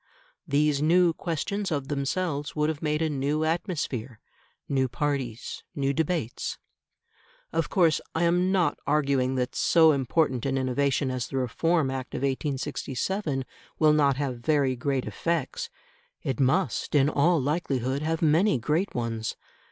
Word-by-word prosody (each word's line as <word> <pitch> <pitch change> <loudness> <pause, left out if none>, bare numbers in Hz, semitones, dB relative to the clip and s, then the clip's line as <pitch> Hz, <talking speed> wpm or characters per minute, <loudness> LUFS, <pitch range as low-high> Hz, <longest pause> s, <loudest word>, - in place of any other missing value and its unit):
These 145 0 +2
new 170 +2 +4
questions 190 +5 -3
of 140 -3 -2
themselves 145 +1 -2
would 150 0 +1
have 160 -2 -4
made 150 +1 0
a - - +2
new 145 +2 0
atmosphere, 155 - -2 0.5
new 135 -2 +1
parties, 125 -2 -3
new 140 -1 0
debates. 160 -5 -2 1.0
Of 165 -1 0
course 170 -5 +3
I 165 - +1
am 180 +2 +3
not 185 -3 +1
arguing 140 -3 +2
that 125 0 -1
so 160 -2 +5
important 135 -2 +1
an 135 0 0
innovation 130 +1 +1
as 125 -2 -3
the 135 - -4
Reform 140 +4 +1
Act 130 -1 -5
of - - -3
1867 140 +3 -2 0.3
will 155 -1 +5
not 140 -3 +3
have 135 -4 -2
very 135 0 +2
great 130 +1 -1
effects. 165 -5 -2 0.5
It 135 - -2
must, 140 +5 +1
in 140 -1 +5
all 155 +3 +3
likelihood, 135 -2 -1
have 160 +1 -1
many 160 +3 +4
great 155 - -1
ones. 115 -2 -3
145 Hz, 145 wpm, -27 LUFS, 130-160 Hz, 1.0 s, so